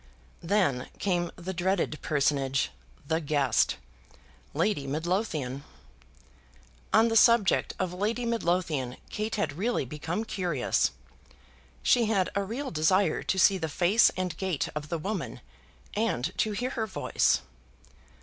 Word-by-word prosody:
Then 165 -9 +1
came 175 -3 0
the 185 +2 -5
dreaded 175 -3 0
personage, 140 -2 +1 0.4
the 160 +1 0
guest, 140 -5 +2 0.8
Lady 165 -3 0
Midlothian! 155 - -2 1.3
On 225 - +5
the 225 - -1
subject 225 -2 +4
of 185 -1 -2
Lady 220 +6 -1
Midlothian 170 - -1
Kate 215 +1 -2
had 205 -9 -1
really 235 - 0
become 160 - -4
curious. 175 - 0 0.9
She 240 -2 +4
had 200 -4 +1
a 200 - 0
real 250 +8 -4
desire 180 +5 +2
to 190 - -1
see 190 0 +5
the 160 -2 -2
face 185 +9 +4
and 185 -1 -2
gait 185 -6 -1
of 150 -1 -5
the 170 - -1
woman, 195 +6 -4 0.5
and 190 - -1
to 215 - +1
hear 250 +5 -2
her 225 -4 -2
voice. 60 - +1
180 Hz, 130 wpm, -28 LUFS, 150-210 Hz, 1.3 s, On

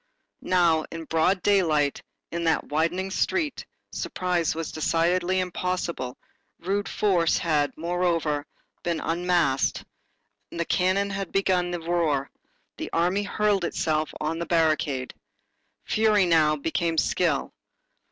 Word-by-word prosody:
Now, 170 -3 +3
in 165 0 -6
broad 165 +5 +1
daylight, 160 -8 +2 0.3
in 170 0 -3
that 165 - +1
widening 170 +5 0
street, 315 - -1 0.2
surprise 180 -3 -1
was 165 -1 -4
decidedly 175 +4 +1
impossible, 180 -7 -3 0.4
rude 200 +3 -2
force 180 -6 +2
had, 150 -5 +1
moreover, 165 -3 0 0.3
been 170 -2 -1
unmasked, 170 -5 +1 0.6
the 170 0 -3
cannon 190 +3 +1
had 195 -1 -4
begun 185 -2 +1
the 175 0 -3
roar, 160 -5 0 0.5
the - - -5
army 180 +4 +1
hurled 205 -1 +1
itself 155 -2 -1
on 160 +2 -2
the 170 - -3
barricade. 155 -5 +1 0.7
Fury 215 -3 +3
now 155 -3 +4
became 165 +2 -1
skill. 160 -3 +1
170 Hz, 115 wpm, -25 LUFS, 160-185 Hz, 0.7 s, now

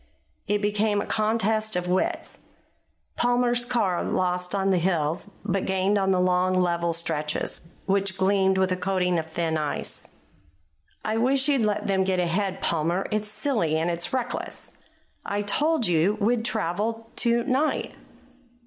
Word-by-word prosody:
It 205 +1 0
became 210 0 +1
a - - -2
contest 215 -1 +1
of 180 0 -1
wits. 180 +1 -1 0.8
Palmer's 245 0 +2
car 215 -8 0
lost 180 +1 -1
on 195 0 +1
the 185 - +3
hills, 165 0 0 0.2
but 195 -1 0
gained 190 +2 +1
on 195 -1 +1
the 185 -1 +3
long 180 0 +2
level 170 -2 +1
stretches, 165 0 -2
which 195 -1 0
gleamed 190 0 +3
with 190 -1 +2
a - - +2
coating 180 -1 0
of 160 - -5
thin 160 -1 -1
ice. 150 -1 -2 1.0
"I 215 +1 0
wish 265 +4 +3
you'd 280 -4 +3
let 210 -2 0
them 190 -1 +2
get 185 -1 0
ahead, 190 +2 -1
Palmer. 170 +3 0
It's 215 0 -1
silly 210 - 0
and 165 +2 0
it's 170 0 -3
reckless." 255 -2 -3 0.5
"I 205 +1 -2
told 295 +6 +2
you 175 +4 +2
we'd 225 +3 +1
travel 225 +2 -2
to 235 0 +2
night." 270 +6 0
195 Hz, 150 wpm, -25 LUFS, 180-220 Hz, 1.0 s, the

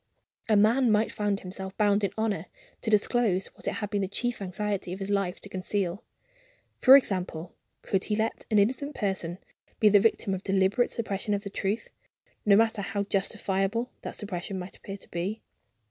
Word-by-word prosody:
A 215 - +5
man 230 +4 +4
might 215 +1 +2
find 205 -1 -1
himself 190 +1 -7
bound 205 -1 +3
in 200 - +2
honor 220 -2 -1 0.3
to 225 - -1
disclose 210 -2 +2
what - - -11
it - - +1
had 210 -2 -4
been 205 -1 0
the 190 - 0
chief 240 +4 -2
anxiety 195 -1 -2
of 190 - -6
his 195 +1 -3
life 195 -3 0
to - - -5
conceal. 190 0 -2 0.8
For 265 +2 +10
example, 185 -8 -2 0.3
could 190 -1 0
he 210 - 0
let 220 +1 -1
an 215 - +3
innocent 260 +8 +1
person 185 -4 -2 0.4
be 215 - +6
the 205 0 +6
victim 205 -1 +1
of 190 - -3
deliberate 195 +5 +2
suppression 205 -2 -1
of 200 - -4
the 200 - -6
truth 205 +3 -2 0.6
no 200 - +7
matter 225 0 +3
how 200 +1 -2
justifiable 200 +3 0
that - - -6
suppression 190 -2 -5
might 180 +1 -7
appear 195 0 -8
to - - -14
be? 190 +6 -3
200 Hz, 185 wpm, -28 LUFS, 190-215 Hz, 0.8 s, For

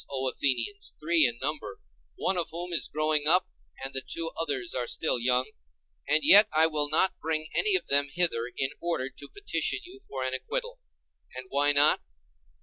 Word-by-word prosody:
O 135 -1 -3
Athenians, 135 - -2
three 155 -2 +3
in 120 0 -6
number, 135 -9 -4 0.4
one 190 - -1
of 175 -2 -1
whom 175 +1 -5
is 165 - 0
growing 155 -1 0
up, 180 +3 +4 0.4
and 135 +1 -5
the 135 - -1
two 165 +5 -3
others 135 -7 -2
are 125 -2 -2
still 155 -2 0
young; 125 +1 0 0.6
and 155 +2 +3
yet 205 +2 +8
I 160 +1 +6
will 150 -2 +1
not 175 +5 +2
bring 155 0 -1
any 415 -2 +3
of 375 - 0
them 140 0 +2
hither 140 -8 +1
in 135 0 -1
order 165 -6 -2
to 140 - -11
petition 415 +1 -1
you 375 +2 -13
for 130 -1 -4
an 130 0 -2
acquittal. - - -4 0.6
And 130 0 -6
why 145 +1 +2
not? 145 +1 +4
150 Hz, 185 wpm, -27 LUFS, 135-170 Hz, 0.6 s, yet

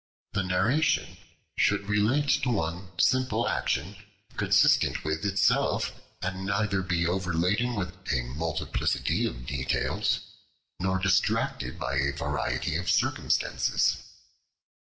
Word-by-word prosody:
The 100 - +1
narration 95 - +1 0.4
should 100 - +1
relate 110 +8 +2
to 130 - 0
one 90 -3 -2
simple 130 -3 +2
action, - - -1 0.4
consistent - - +3
with 80 +4 -2
itself, 100 0 +2 0.3
and 95 +1 -3
neither 100 -1 0
be 85 -2 0
overladen 90 +7 0
with 90 -4 -2 0.2
a 65 - +1
multiplicity 75 +6 -1
of - - -7
details, 65 -1 0 0.6
nor 95 +1 +1
distracted 95 0 0
by 70 - -2
a 70 +1 +1
variety 75 +2 -2
of 85 0 -3
circumstances. - - +1
95 Hz, 110 wpm, -28 LUFS, 80-105 Hz, 0.6 s, consistent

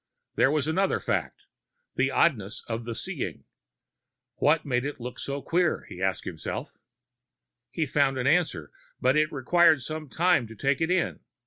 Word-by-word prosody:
There - - +4
was 150 0 0
another 190 +5 +1
fact, - - -2 0.5
the 135 +1 +1
oddness 120 - +1
of 115 0 -4
the 115 -1 -4
seeing. - - -4 0.9
What 150 +2 +3
makes 125 -1 0
it 145 - -6
look 125 +1 -7
so 140 0 -4
queer, 175 -1 +1
he 90 - -9
asked 95 0 0
himself. 80 -3 -6 0.9
He 160 - -1
found 135 -1 +1
an 125 - -2
answer, 140 - +1 0.3
but 130 +2 +3
it 155 +1 +2
required 155 +1 +4
some 155 -2 -6
time 165 -8 +2
to 115 - -11
take 135 +6 0
it 160 - +1
in. 180 -1 0
140 Hz, 160 wpm, -27 LUFS, 125-160 Hz, 0.9 s, There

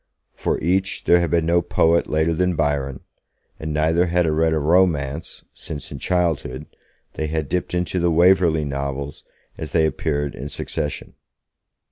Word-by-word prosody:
For - - -2
each 95 +4 0
there 85 - +5
had 85 - 0
been 85 -1 +1
no 85 +1 +3
poet 85 -1 +2
later 80 +2 +1
than 90 +2 +1
Byron, 70 -3 -1 0.6
and 80 0 -4
neither 80 +4 +2
had 90 0 +2
read 80 +1 +2
a 80 - +1
romance 80 -2 +1
since, 75 -3 -7
in 70 - -7
childhood, 80 -5 -1 0.5
they 80 - -3
had 80 -1 -2
dipped 90 +3 -2
into 90 +1 -1
the 85 0 +2
Waverley 85 -2 +4
Novels 70 0 -4 0.4
as 80 - -6
they 80 -2 +4
appeared 75 -2 -1
in 70 +4 -7
succession. 75 0 -4
80 Hz, 155 wpm, -22 LUFS, 75-85 Hz, 0.6 s, there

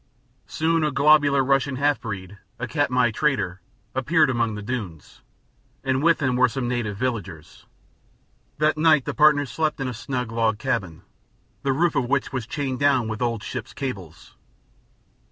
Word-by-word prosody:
Soon 165 0 0
a 150 - +2
globular 145 -1 +4
Russian 135 0 +1
half 145 +2 +1
breed, 100 -2 -7 0.2
the 125 - -4
Katmai 125 -3 +1
trader, 110 - -1 0.3
appeared 150 +2 +2
among 115 -3 0
the 105 - -7
dunes, 100 - -6 0.6
and 130 0 0
with 165 -1 +3
him 130 -2 +1
were 130 0 +4
some 125 0 -3
native 120 -5 -2
villagers. 100 -10 -5 0.9
That 155 +1 +1
night 155 -4 +4
the - - -3
partners 150 -2 +4
slept 155 -2 -1
in 135 - -2
a 125 - -3
snug 125 0 -4
log 115 -2 +1
cabin, 110 -9 -3 0.6
the 135 - 0
roof 160 +4 +1
of 130 -4 0
which 140 0 0
was 125 -4 -3
chained 135 -1 -3
down 135 -5 +2
with 110 +2 -5
old 115 -3 -1
ships' 115 +1 -6
cables. 95 - -7
130 Hz, 160 wpm, -23 LUFS, 115-145 Hz, 0.9 s, globular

